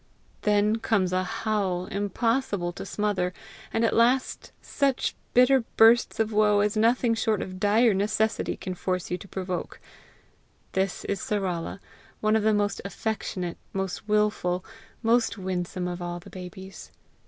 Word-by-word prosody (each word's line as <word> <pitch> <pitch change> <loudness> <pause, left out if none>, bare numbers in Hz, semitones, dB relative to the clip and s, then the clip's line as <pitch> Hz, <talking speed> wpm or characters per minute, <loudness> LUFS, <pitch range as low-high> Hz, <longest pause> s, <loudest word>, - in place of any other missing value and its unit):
Then 210 +1 +3
comes 200 -5 +1
a 185 0 +2
howl 190 -2 -1
impossible 205 -1 -1
to 185 - -8
smother, 185 -3 -1 0.4
and 225 +1 +1
at - - +1
last 245 +3 +2
such 275 -3 0 0.2
bitter 250 +2 +6 0.2
bursts 230 +1 +5
of 220 0 +1
woe 210 -1 +4
as 210 +1 +1
nothing 230 +2 +3
short 220 -1 +1
of 185 0 -6
dire 215 +3 +4
necessity 215 +3 0
can 185 - -5
force 185 -1 -3
you 180 - -1
to - - -11
provoke. 185 -2 -4 0.9
This 190 -1 -1
is 200 - -2
Sarala, 190 -4 -2 0.4
one 215 0 +2
of 220 - +3
the 220 +1 +3
most 205 -1 0
affectionate, 195 -3 -4
most 190 +1 -3
wilful, 210 -4 +1 0.4
most 230 0 +2
winsome 185 -1 -3
of 175 0 -5
all 175 0 -4
the - - -14
babies. 190 +1 -9
205 Hz, 145 wpm, -26 LUFS, 185-220 Hz, 0.9 s, bitter